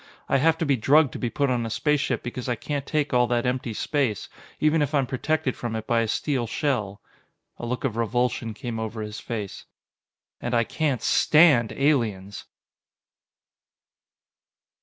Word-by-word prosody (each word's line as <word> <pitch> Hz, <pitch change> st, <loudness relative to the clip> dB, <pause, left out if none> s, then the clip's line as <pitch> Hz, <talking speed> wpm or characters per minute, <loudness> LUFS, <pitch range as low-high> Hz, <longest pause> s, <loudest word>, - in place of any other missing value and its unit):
"I -, -, +3 dB
have 160 Hz, +3 st, +3 dB
to 165 Hz, -, -1 dB
be 140 Hz, -2 st, +3 dB
drugged 140 Hz, +4 st, +4 dB
to -, -, -6 dB
be 120 Hz, -, -1 dB
put 140 Hz, +2 st, 0 dB
on 120 Hz, -2 st, 0 dB
a 115 Hz, -, -3 dB
spaceship 150 Hz, +4 st, 0 dB
because 125 Hz, +1 st, -5 dB
I 120 Hz, -, +1 dB
can't 140 Hz, +3 st, -4 dB
take 150 Hz, -2 st, -1 dB
all 125 Hz, -1 st, +4 dB
that 120 Hz, 0 st, 0 dB
empty 125 Hz, -1 st, -1 dB
space, 120 Hz, -1 st, -1 dB, 0.3 s
even 155 Hz, +1 st, +3 dB
if 145 Hz, +1 st, 0 dB
I'm 140 Hz, -2 st, +3 dB
protected 135 Hz, +1 st, -1 dB
from 115 Hz, -2 st, -4 dB
it 110 Hz, -1 st, -4 dB
by 115 Hz, 0 st, +2 dB
a 115 Hz, -, 0 dB
steel 125 Hz, +1 st, -1 dB
shell." 105 Hz, -7 st, -2 dB, 0.6 s
A 120 Hz, -, -5 dB
look 125 Hz, +1 st, -3 dB
of 125 Hz, -6 st, -1 dB
revulsion 115 Hz, 0 st, -1 dB
came 115 Hz, 0 st, -5 dB
over 110 Hz, 0 st, -4 dB
his 105 Hz, 0 st, -6 dB
face. 105 Hz, -4 st, -6 dB, 0.8 s
"And 120 Hz, 0 st, -1 dB
I 115 Hz, -, +4 dB
can't 135 Hz, -1 st, -1 dB
stand 150 Hz, -8 st, +5 dB
aliens!" 110 Hz, -9 st, 0 dB
125 Hz, 170 wpm, -25 LUFS, 115-145 Hz, 0.8 s, stand